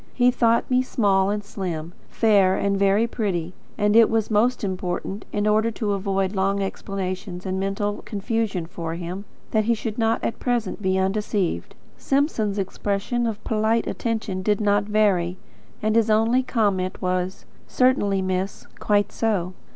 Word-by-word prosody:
He 250 0 +4
thought 235 -1 +2
me 255 0 +4
small 200 -6 +2
and 205 0 -1
slim; 175 -5 -5 0.2
fair 200 -4 +3
and 200 0 +1
very 200 +3 +3
pretty; 190 -7 -2 0.2
and 210 0 +2
it 230 -1 +7
was 225 -1 0
most 235 +4 +2
important, 190 +1 -3
in 205 0 -1
order 215 +2 +3
to 215 -2 -2
avoid 195 -1 -1
long 195 +1 +1
explanations 190 -1 -4
and 190 0 -2
mental 195 +1 -2
confusion 210 -4 -2
for 165 -1 -5
him, 180 +4 -6 0.3
that 215 -1 +2
he 235 +1 +3
should 220 0 -5
not 225 0 +1
at - - -2
present 240 -3 -1
be 190 -1 +1
undeceived. 190 - -1 0.2
Simpson's 270 -8 0
expression 205 +4 -1
of 215 -1 -4
polite 220 +1 +1
attention 220 -5 -2
did 205 +1 +1
not 205 -1 +2
vary, 200 -4 +2 0.5
and 215 0 +1
his 230 -1 +3
only 225 +4 +3
comment 200 -7 0
was: 185 0 -2 0.2
"Certainly, 205 -7 +2
miss. 185 +1 -2
Quite 205 -1 +2
so." 195 -5 -1
205 Hz, 155 wpm, -23 LUFS, 190-225 Hz, 0.5 s, it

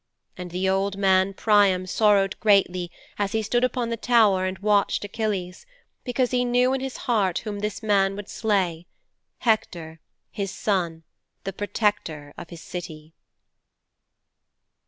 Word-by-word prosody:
And 180 -1 -7
the 180 +2 -2
old 195 +1 0
man 190 0 +3
Priam 200 -4 +3
sorrowed 195 0 +2
greatly 185 -4 +2 0.3
as 200 -1 -1
he 220 0 0
stood 240 +3 0
upon 250 -2 0
the 230 - -2
tower 215 -6 +3
and 185 0 -4
watched 205 0 +1
Achilles, 200 - -4 0.4
because 250 0 0
he 250 -1 +2
knew 250 +1 +2
in 270 - -1
his 265 -1 -5
heart 200 -7 +1
whom 205 -1 -4
this 210 +1 -4
man 195 -2 +2
would 205 0 -7
slay 185 -6 -1 0.5
Hector, 170 -8 -1 0.3
his 200 -1 -3
son, 175 -6 -2 0.4
the 195 - -4
protector 200 -8 -2
of - - -10
his 170 -2 -10
City.' 160 -3 -8
200 Hz, 140 wpm, -24 LUFS, 185-220 Hz, 0.5 s, man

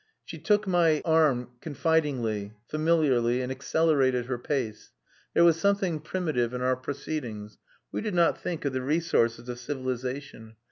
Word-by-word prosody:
She - - -8
took 210 -1 +2
my 170 -5 +3
arm 150 -7 +3
confidingly, 135 -10 0
familiarly, 150 -7 +2
and 125 - -4
accelerated 135 -2 +1
her 125 -1 -3
pace. 125 -5 -3 0.4
There - - +6
was 165 -1 +5
something 195 -4 +1
primitive 150 -8 -1
in 125 - -3
our 130 0 +2
proceedings. 125 -5 -6 0.3
We - - -3
did 210 -3 -3
not 170 -1 +3
think 170 -4 -4
of 140 - 0
the 130 - -1
resources 125 -5 +1
of 120 -1 -5
civilization. 130 -3 -5
140 Hz, 145 wpm, -27 LUFS, 125-160 Hz, 0.4 s, There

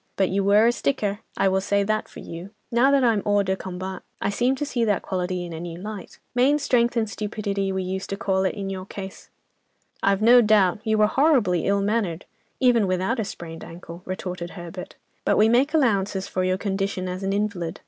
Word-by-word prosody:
But 190 -1 +2
you 195 +1 0
were 205 +3 +5
a 235 - +5
sticker, 215 -5 -1 0.2
I - - +3
will 190 0 +2
say 200 +1 +1
that 215 +1 -1
for - - -11
you. 170 +3 -8 0.2
Now 240 +3 +4
that 280 -1 +4
I'm 225 -4 +3
hors 205 -1 +2
de 190 0 0
combat, 190 0 -6 0.2
I - - -1
seem 245 +6 +1
to 295 - -3
see 245 -4 -1
that 205 -4 +1
quality 180 -1 -2
in 170 - -7
a 160 - -6
new 170 0 -6
light. 210 0 -8 0.2
Main 260 +4 +4
strength 240 -4 +1
and 220 -1 +1
stupidity 200 -1 -3
we 190 0 -2
used 190 +1 -4
to 195 - -3
call 190 -1 0
it 190 - 0
in 195 -1 -4
your 190 0 -6
case." 190 -1 -8 0.7
"I've 200 +1 +2
no 245 +2 +8
doubt; 210 -4 +3
you 220 -1 +1
were 215 - +5
horribly 230 - +2
ill 200 0 +2
mannered, 200 -5 -1 0.3
even 240 -5 +4
without 185 +7 0
a - - +1
sprained 165 -5 -8
ankle," 170 0 -10
retorted 180 -2 -5
Herbert, 175 +1 -8 0.3
"but - - +2
we 215 - +5
make 250 +6 +3
allowances 200 -10 +1
for 185 - -1
your 185 0 +1
condition 195 -2 -2
as 180 +1 -4
an 195 0 -1
invalid. 200 -5 -2
200 Hz, 215 wpm, -24 LUFS, 185-220 Hz, 0.7 s, no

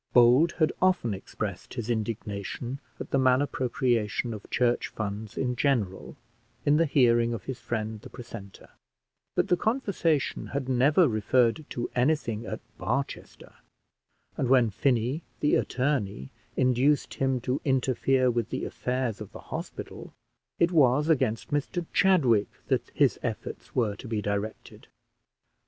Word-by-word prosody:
Bold 125 +7 +6
had 155 -3 +2
often 180 - +2
expressed 100 +1 -6
his 120 -4 -4
indignation 110 +2 -3 0.2
at - - -7
the 135 - +3
malappropriation 125 -4 +1
of 105 - -9
church 120 -1 +1
funds 105 0 -5
in 125 -1 0
general, 120 -9 0 0.5
in 145 +1 +4
the 165 0 +3
hearing 120 -4 +3
of - - -8
his 130 -2 -5
friend 110 -3 -3
the - - -11
precentor; 115 -5 -10 0.7
but - - +2
the 180 - +4
conversation 195 - 0
had 140 -2 -3
never 140 +7 +4
referred 120 +5 +2
to 120 - -3
anything 125 -4 0
at - - -5 0.2
Barchester; 120 +10 -4 0.8
and 130 - 0
when 125 -4 +5
Finney, 125 - +1 0.2
the 150 - +2
attorney, 110 - 0 0.3
induced 130 +3 +2
him 135 -1 0
to 125 +3 -1
interfere 130 -1 +2
with 120 -1 -1
the - - -3
affairs 125 -4 -2
of 105 - -8
the - - -12
hospital, - - -7 0.4
it 170 +1 +3
was 150 -1 +4
against 115 -7 +1
Mr 145 +4 -1
Chadwick 130 - +4 0.2
that - - 0
his - - +3
efforts - - -5
were 110 -5 +1
to 125 - -9
be 110 -1 -1
directed. 105 +1 -4
125 Hz, 140 wpm, -28 LUFS, 110-140 Hz, 0.8 s, Bold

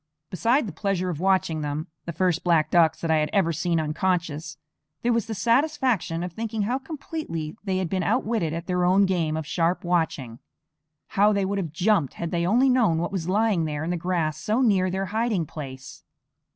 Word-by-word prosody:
Beside 235 - +2
the 190 - -6
pleasure 185 0 -1
of 155 - -5
watching 185 -4 +1
them, 150 +1 -3 0.2
the 170 - -3
first 175 0 0
black 165 -3 +2
ducks 165 -3 +4
that 165 - 0
I 160 - +4
had 150 0 +1
ever 180 -5 +2
seen 165 +2 0
unconscious, 155 -1 -2 0.5
there 240 0 +2
was 230 -1 0
the 220 - -4
satisfaction 235 - +1
of 180 -1 -5
thinking 220 +1 -3
how 245 +6 -1
completely 270 - -5
they 190 -2 -1
had 185 -2 -1
been 185 +2 -1
outwitted 220 -4 0
at 165 +1 -4
their 180 -1 0
own 190 +3 +4
game 165 -5 0
of 160 - -4
sharp 170 +3 0
watching. 160 -9 -1 0.7
How 205 +2 +4
they 200 -1 +1
would 200 +1 -1
have 170 -6 -3
jumped 175 -3 +1
had 170 - -4
they 170 0 0
only 245 +7 +4
known 240 -10 +3
what 170 +4 -2
was 180 -3 -3
lying 205 -4 +2
there 150 -1 -3
in 165 - -2
the - - 0
grass 165 -3 -1
so 220 +10 +1
near 190 -5 +3
their 190 +1 -2
hiding 220 -6 0
place! 135 -3 -9
180 Hz, 205 wpm, -25 LUFS, 160-205 Hz, 0.7 s, ducks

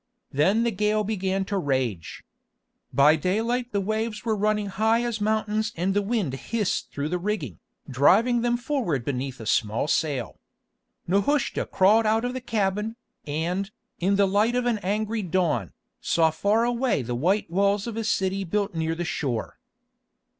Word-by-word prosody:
Then 190 +11 +3
the 235 - +1
gale 210 +1 +1
began 195 -2 -1
to 200 0 -1
rage. 130 - -2 0.7
By 145 +3 +5
daylight 230 - -1
the 205 - 0
waves 215 +2 -2
were 220 -2 +1
running 210 0 +1
high 220 +4 +1
as 235 -3 -3
mountains 215 0 0
and 185 +3 0
the 205 - +2
wind 205 - -1
hissed 205 - -2
through 145 +1 -3
the 180 +1 -1
rigging, 170 - -3 0.3
driving 205 - +4
them 240 0 +1
forward 240 - -2
beneath 135 -1 -3
a 110 - -8
small 110 +6 +1
sail. 145 -6 -1 0.7
Nehushta 240 +9 +1
crawled 215 +4 +4
out 220 +2 +2
of 250 - -2
the 260 - -4
cabin, 210 -1 -1 0.3
and, 175 +7 -2 0.3
in 195 +3 +2
the 200 0 +4
light 210 +5 +2
of 250 0 0
an 235 -3 +1
angry 215 +3 -1
dawn, 165 - 0 0.3
saw 165 -1 +2
far 205 +8 +1
away 240 - 0
the 120 +1 -4
white 170 - 0
walls 200 +2 +2
of 230 -2 -5
a 225 - -2
city 195 -2 0
built 200 +2 -1
near 160 0 -1
the 175 +1 -3
shore. 130 -9 -3
200 Hz, 165 wpm, -25 LUFS, 160-220 Hz, 0.7 s, By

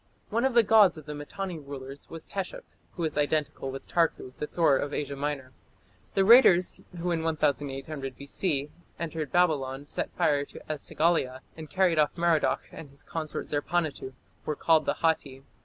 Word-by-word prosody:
One 230 +4 +1
of 265 -2 +1
the 235 - +7
gods 210 -4 +6
of 155 - -10
the 150 - -6
Mitanni 175 +4 -5
rulers 140 -1 -9
was 165 -1 -8
Teshup, 195 -2 -5 0.3
who 175 - -4
is 155 -2 -1
identical 145 -2 0
with 135 0 -7
Tarku, 160 -6 0
the 150 - -3
Thor 165 -4 +3
of 145 +1 -3
Asia 140 -1 -3
Minor. 140 -2 -3 0.6
The 195 - +4
raiders 195 -6 +6 0.2
who 175 +1 -1
in 165 -1 0
1800 140 -3 -2
B.C. 140 0 -2 0.3
entered 160 -3 -4
Babylon, 145 -6 +1
set - - -3
fire 145 -1 +2
to - - -12
E 155 - -5
sagila, 140 -5 0
and 155 -2 -9
carried 185 -4 +2
off 150 +3 +2
Merodach 170 -2 +2
and 150 - -10
his 140 +1 -14
consort 155 -2 -4
Zerpanituᵐ, 150 -3 -2 0.3
were 150 - -2
called 160 0 +3
the - - +1
Hatti. 140 -5 0
155 Hz, 175 wpm, -28 LUFS, 140-170 Hz, 0.6 s, the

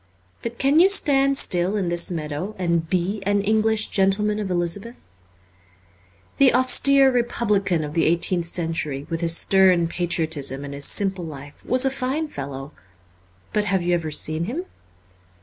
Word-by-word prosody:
But 235 0 -6
can 280 +3 +2
you 370 +3 +6
stand 275 -7 +3
still 180 -1 +2
in 185 -4 -2
this 170 0 0
meadow 160 +4 -5
and 170 -3 -1
be 185 +4 -1
an 200 +1 0
English 220 +1 +1
gentleman 210 +2 0
of 205 -2 -4
Elizabeth? 180 - -3 1.3
The 275 -2 +4
austere 270 +1 +4
re 245 -1 +2
publican 200 -8 -1
of 150 0 -6
the 165 - +1
eighteenth 170 +1 +1
century, 160 -5 -3
with 165 0 -3
his 165 0 +1
stern 185 -3 +3
patriotism 160 -6 -2
and 140 - -8
his 140 0 -3
simple 195 -3 -1
life, 145 -2 -11
was 255 +1 +2
a 265 - +1
fine 270 +4 -3
fellow. 140 - -8 0.8
But 210 -1 0
have 190 -3 0
you 175 0 0
ever 165 -2 -1
seen 155 +2 -1
him 300 - -5
185 Hz, 160 wpm, -22 LUFS, 165-220 Hz, 1.3 s, you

